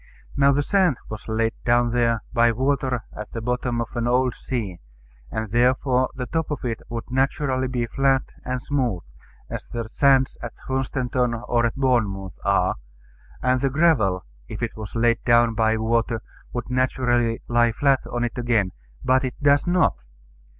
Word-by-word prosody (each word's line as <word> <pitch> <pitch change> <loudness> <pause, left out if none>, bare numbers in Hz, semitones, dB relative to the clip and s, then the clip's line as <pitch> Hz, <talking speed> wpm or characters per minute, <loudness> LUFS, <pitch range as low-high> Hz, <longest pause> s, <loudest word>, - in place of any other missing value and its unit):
Now 140 0 +5
the 145 +1 +1
sand 185 - +2
was 110 0 -7
laid 115 0 0
down 120 0 +3
there 115 -2 +1
by 120 -1 +4
water 130 -1 0
at 105 - -7
the 115 - -3
bottom 125 +1 -1
of 115 - -6
an 120 0 0
old 125 0 +2
sea; 105 -11 -4 0.5
and 110 -2 -4
therefore 125 +2 +2
the 125 -1 -3
top 160 +3 -2
of 150 -4 -4
it 115 -2 -2
would 115 +1 -6
naturally 130 0 0
be 125 -2 -1
flat 135 +2 +2 0.2
and 125 0 -2
smooth, 125 -9 -1 0.4
as - - -6
the 115 -1 -4
sands 135 -2 +3
at 120 -1 -7
Hunstanton 130 -2 0
or 120 -1 +2
at 115 - -5
Bournemouth 110 -8 0
are; 100 -2 +2 0.7
and 130 0 +2
the 135 - +2
gravel, 130 - +2 0.2
if - - -6
it - - -3
was 110 -1 -8
laid 115 0 +2
down 120 -1 +4
by 110 0 +2
water, 115 +1 0 0.3
would 120 +1 -5
naturally 120 -2 +1
lie 120 0 +3
flat 135 +2 +2
on 120 0 -2
it 120 +1 -3
again: 115 -6 +1 0.3
but 130 +2 +3
it 130 -2 -3
does 145 +2 +3
not. 175 - +3
120 Hz, 170 wpm, -23 LUFS, 115-130 Hz, 0.7 s, Now